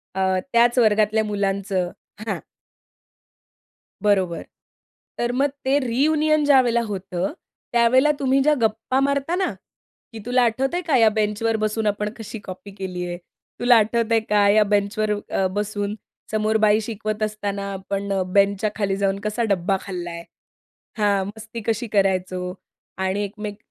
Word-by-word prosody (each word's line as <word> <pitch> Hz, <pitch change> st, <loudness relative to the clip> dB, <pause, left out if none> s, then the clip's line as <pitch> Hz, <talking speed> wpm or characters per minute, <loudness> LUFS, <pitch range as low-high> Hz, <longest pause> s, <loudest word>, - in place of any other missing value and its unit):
अ, 190 Hz, -, -1 dB, 0.3 s
त्याच 235 Hz, +1 st, +4 dB
वर्गातल्या 215 Hz, -1 st, +3 dB
मुलांचं 195 Hz, -3 st, -1 dB, 0.4 s
हां. -, -, -1 dB, 1.6 s
बरोबर. 190 Hz, -5 st, +1 dB, 0.7 s
तर 240 Hz, 0 st, 0 dB
मग 270 Hz, +3 st, +2 dB, 0.2 s
ते 270 Hz, +2 st, +3 dB
रियुनियन 300 Hz, +4 st, +2 dB
ज्यावेळेला 255 Hz, -4 st, +4 dB
होतं, 190 Hz, 0 st, -3 dB, 0.4 s
त्यावेळेला 250 Hz, +5 st, +5 dB
तुम्ही 270 Hz, 0 st, +2 dB
ज्या 300 Hz, +2 st, +4 dB
गप्पा 225 Hz, +4 st, +1 dB
मारता 280 Hz, +4 st, 0 dB
ना, 380 Hz, 0 st, 0 dB, 0.6 s
की 225 Hz, -, -7 dB
"तुला 250 Hz, +1 st, +3 dB
आठवतंय 270 Hz, +9 st, 0 dB
का 285 Hz, -5 st, +4 dB
या 225 Hz, -2 st, +6 dB
बेंचवर 215 Hz, +1 st, 0 dB
बसून 215 Hz, 0 st, -1 dB
आपण 210 Hz, 0 st, 0 dB
कशी 225 Hz, 0 st, -7 dB
कॉपी 185 Hz, +2 st, -9 dB
केली 185 Hz, -2 st, -4 dB
आहे. 175 Hz, 0 st, -4 dB, 0.4 s
तुला 245 Hz, 0 st, +5 dB
आठवतंय 225 Hz, +1 st, +2 dB
का 205 Hz, -1 st, +4 dB
या 215 Hz, +1 st, +5 dB
बेंचवर 210 Hz, +1 st, 0 dB, 0.2 s
अ, 190 Hz, -, +1 dB
बसून 205 Hz, +1 st, -3 dB, 0.4 s
समोर 215 Hz, 0 st, +1 dB
बाई 215 Hz, 0 st, +4 dB
शिकवत 215 Hz, -1 st, -3 dB
असताना 200 Hz, -2 st, -3 dB
आपण 195 Hz, +1 st, -4 dB, 0.2 s
बेंचच्या 200 Hz, +1 st, +3 dB
खाली 200 Hz, -3 st, 0 dB
जाऊन 195 Hz, 0 st, 0 dB
कसा 215 Hz, +3 st, -1 dB
डब्बा 195 Hz, 0 st, +1 dB
खाल्ला 180 Hz, -3 st, -5 dB
आहे?" 170 Hz, 0 st, -7 dB, 0.7 s
हां. 200 Hz, -2 st, +2 dB
"मस्ती 225 Hz, +2 st, -8 dB
कशी 230 Hz, +1 st, 0 dB
करायचो. 185 Hz, -3 st, 0 dB, 0.4 s
आणि 190 Hz, +2 st, -1 dB
एकमेक," 205 Hz, 0 st, -6 dB
210 Hz, 140 wpm, -22 LUFS, 200-235 Hz, 1.6 s, या